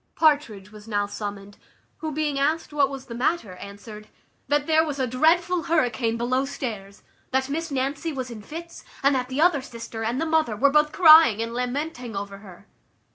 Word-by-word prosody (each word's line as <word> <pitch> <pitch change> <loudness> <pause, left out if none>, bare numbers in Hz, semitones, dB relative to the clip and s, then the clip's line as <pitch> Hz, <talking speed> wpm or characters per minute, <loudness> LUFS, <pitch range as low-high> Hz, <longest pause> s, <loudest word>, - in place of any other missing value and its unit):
Partridge 285 - +1
was 210 0 -13
now 205 -2 0
summoned, 205 -1 -7 0.4
who, 315 -1 -4
being 295 -2 -1
asked 310 +2 0
what 285 -2 +3
was 275 -1 -8
the 235 - -8
matter, 245 - -1
answered, 210 +2 -10 0.4
"That 290 0 +1
there 320 0 +4
was 295 -3 -4
a 260 - 0
dreadful 330 +7 +2
hurricane 245 -7 +1
below 255 +3 0
stairs; 215 -8 -6 0.3
that 265 0 0
Miss 325 +3 -3
Nancy 275 +4 -2
was 260 -3 -5
in 220 -2 -8
fits; 335 +9 -9 0.2
and 280 +1 +4
that 255 -1 -1
the 265 +3 -1
other 330 -5 +4
sister, 230 -3 -7
and 235 +4 -1
the 325 - 0
mother, 315 -8 +1
were 275 +6 +3
both 300 +1 +3
crying 315 - +7
and 230 +1 -3
lamenting 250 -1 -4
over 200 0 -6
her." 200 -1 -14
260 Hz, 185 wpm, -24 LUFS, 225-305 Hz, 0.4 s, crying